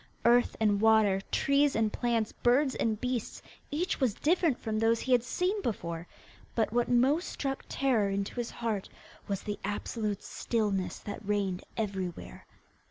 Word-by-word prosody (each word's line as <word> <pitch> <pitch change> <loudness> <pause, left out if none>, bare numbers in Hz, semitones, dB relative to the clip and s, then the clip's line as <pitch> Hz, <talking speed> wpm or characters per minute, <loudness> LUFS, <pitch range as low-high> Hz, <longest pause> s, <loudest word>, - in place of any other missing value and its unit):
Earth 240 +1 +4
and 205 -2 +2
water, 220 -3 +4
trees 280 +1 +3
and 220 -1 +1
plants, 235 -3 0
birds 260 +3 +2
and 220 -2 0
beasts, 250 -2 -3 0.3
each 350 +6 -1
was 250 -7 +1
different 325 -4 +2
from 215 -1 -2
those 225 +1 +3
he 260 - -3
had 245 -1 +6
seen 365 +10 -1
before; 170 - -3 0.5
but 225 -1 +1
what 240 0 +1
most 265 +8 +3
struck 270 -1 -3
terror 240 -7 +2
into 195 0 -2
his 240 -1 -2
heart 220 -4 -3 0.4
was 200 -1 -2
the 205 -1 -4
absolute 205 0 -3
stillness 205 -5 -1
that 205 - -7
reigned 200 -3 -1
everywhere. 195 -5 -4
225 Hz, 155 wpm, -30 LUFS, 205-255 Hz, 0.5 s, had